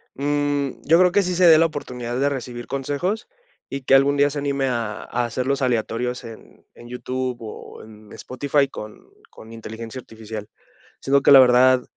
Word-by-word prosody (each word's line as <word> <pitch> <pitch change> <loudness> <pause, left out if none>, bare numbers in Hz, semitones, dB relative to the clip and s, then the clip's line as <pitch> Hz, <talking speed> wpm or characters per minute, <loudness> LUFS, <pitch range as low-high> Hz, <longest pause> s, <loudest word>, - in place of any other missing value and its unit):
Mm, 145 0 -1
yo 165 +3 +4
creo 180 -1 +5
que 205 +2 +3
sí 180 -1 -2
se 180 0 +5
dé 160 -2 +8
la 165 - +4
oportunidad 125 -5 -6
de 140 - +2
recibir 125 -3 -6
consejos 145 - -3 0.4
y 140 - -5
que 135 - +4
algún 140 +1 +3
día 145 0 +4
se 145 0 -5
anime 140 -1 -1
a 115 -4 -3
a 120 0 -2
hacerlos 130 +4 -2
aleatorios 125 0 -2
en 115 -1 -13
en 120 - -14
YouTube 125 0 -4
o 110 -2 -10
en 110 -1 -16
Spotify 140 +2 -1
con 105 -4 -10 0.2
con 110 +1 -14
inteligencia 115 +2 -8
artificial. 110 -2 -9 0.5
Siento 140 +1 +2
que - - +4
la 135 - +10
verdad, 130 0 +5
130 Hz, 180 wpm, -22 LUFS, 120-140 Hz, 0.5 s, la